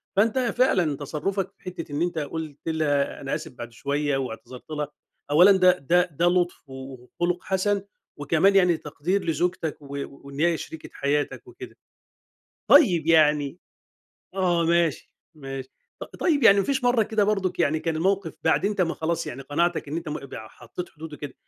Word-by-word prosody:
فأنت 220 +5 +3
فعلًا 230 - +2
تصرُّفك 190 +7 -3
في - - -34
حتّة 180 -4 -7
إن 145 +3 -2
أنت 175 -2 -1
قُلت 155 0 -6
لها 150 -3 0
أنا 135 +2 -2
آسف 155 -1 -6
بعد 120 -1 -9
شوية 140 +3 -1
واعتذرت 125 +1 -7
لها، 150 -1 -2 0.4
أولًا 180 +7 +7
ده 185 -1 +5
ده 175 +4 +2
ده 165 +4 0
لُطف 175 -5 -1
و - - -10 0.5
وخُلُق 180 0 0
حَسَن 195 +1 0 0.4
وكمان 160 +7 +3
يعني 180 -3 +4
تقدير 170 +7 -2
لزوجتك 165 0 -1
و 140 - -13 0.2
وإن 140 0 -12
هي 170 +1 +3
شريكة 160 0 -9
حياتك 145 +1 -1
وكده. - - -11 0.9
طيب 185 - +6
يعني 150 -2 +4 0.8
آه، 175 -3 +2
ماشي، 170 -2 +1 0.2
ماشي. 135 -3 -7 0.3
ط - - -4
طيب 305 -6 +1
يعني 200 -3 +7
ما 195 - +2
فيش 265 -2 -1
مرّة 245 -2 +4
كده 215 -1 +1
برضه 195 -3 0
يعني 155 +2 +2
كان 160 0 -2
الموقف 190 0 0
بعد 160 - +2
أنت 205 -1 -1
ما 170 -2 +1
خلاص، 165 +1 -2
يعني 135 +3 -6
قناعتك 165 +3 -1
إن 150 - -3
أنت 170 -1 -5
م 150 -2 -5
بع 110 -4 -9
حطّيت 125 +12 -8
حدود 160 0 -10
وكده، 145 -3 -8
165 Hz, 175 wpm, -25 LUFS, 145-185 Hz, 0.9 s, أولًا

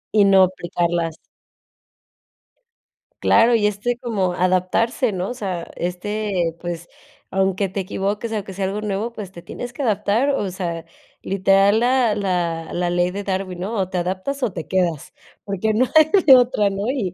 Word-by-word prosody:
Y 210 - +6
no 195 -1 +6
aplicarlas. 175 -2 -2 2.0
Claro, 230 +1 +4
y 215 -2 +2
este 210 +4 -1
como 215 -8 -1
adaptarse, 185 +8 +1
¿no? 185 0 -3
O - - -3
sea, 190 -8 -4
este, 180 -1 -2
pues, 175 -1 -5 0.4
aunque 195 0 0
te 195 - -4
equivoques, 200 +4 -3
aunque 200 -3 -4
sea 195 +1 -2
algo 200 +2 -3
nuevo, 210 +3 -3
pues, 205 -5 -8
te 175 - -11
tienes 240 +7 -7
que 265 - -6
adaptar, 220 +2 +1
o 205 -9 -1
sea, 170 -3 -4 0.4
literal 195 +2 +3
la 245 -2 +3
la 175 -5 -1
la 175 0 0
ley 175 0 +1
de 200 +2 -5
Darwin, 190 -2 -3
¿no? 200 +5 -3
O 190 -2 -1
te 185 - -3
adaptas 185 +11 -3
o 240 - +1
te 165 -3 -6
quedas, 175 -5 -1 0.3
porque 200 +2 -1
no 240 +4 +3
hay 315 0 +7 0.2
de 270 -3 +10
otra, 240 -5 +3
¿no? 200 +2 -3
Y 210 -10 -2
195 Hz, 170 wpm, -21 LUFS, 180-220 Hz, 2.0 s, de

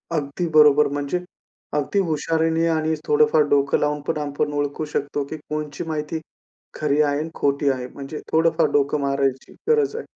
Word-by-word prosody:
अगदी 150 +3 -2
बरोबर. 150 -1 +6
म्हणजे 145 +5 -1 0.6
अगदी 150 +7 0
हुशारीने 165 -1 +1
आणि 160 -1 +1
थोडं 150 +1 +5
फार 155 - +5
डोकं 140 -1 +3
लावून 150 0 0
पण - - 0
आपण 145 0 -2
ओळखू 145 +1 -2
शकतो 145 0 -1
की 155 - -5
कोणची 150 -1 -5
माहिती 155 0 -3 0.6
खरी 150 -1 +1
आहे 145 -1 +2
आणि 155 +2 -3
खोटी 140 0 +1
आहे. 130 -2 -2
म्हणजे 140 +3 -8
थोडं 165 +1 +4
फार 165 -2 +4
डोकं 145 +1 +2
मारायची 140 -1 -1 0.2
गरज 445 -2 +3
आहे. 465 - -5
150 Hz, 170 wpm, -22 LUFS, 140-160 Hz, 0.6 s, बरोबर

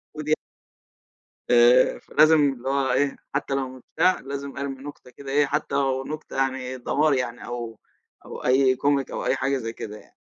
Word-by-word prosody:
موجود 155 0 -1 1.2
آآ، 120 +1 +5
فلازم 155 +1 +4
اللي 130 0 -7
هو 135 -1 +1
إيه، 140 -1 +1 0.2
حتى 140 -1 -1
لو 135 -1 -1
مش 130 -1 -12
بتاع، 185 0 +3
لازم 140 +1 -6
أرمِي 135 -1 -5
نكتة 145 -3 -10
كده 135 +1 -10
إيه، 145 0 +4
حتى 145 0 -2
لو 135 -1 0
نكتة 155 +2 -7
يعني 130 -1 -1
دمار 145 +4 +2
يعني، 125 -2 -3
أو 120 -2 -6 0.5
أو - - -9
أي 130 0 +4
comic 140 0 +1
أو - - -4
أي - - +2
حاجة 135 0 0
زي 115 -2 -5
كده 105 -2 -7
يعني. - - -21
135 Hz, 180 wpm, -24 LUFS, 125-140 Hz, 1.2 s, آآ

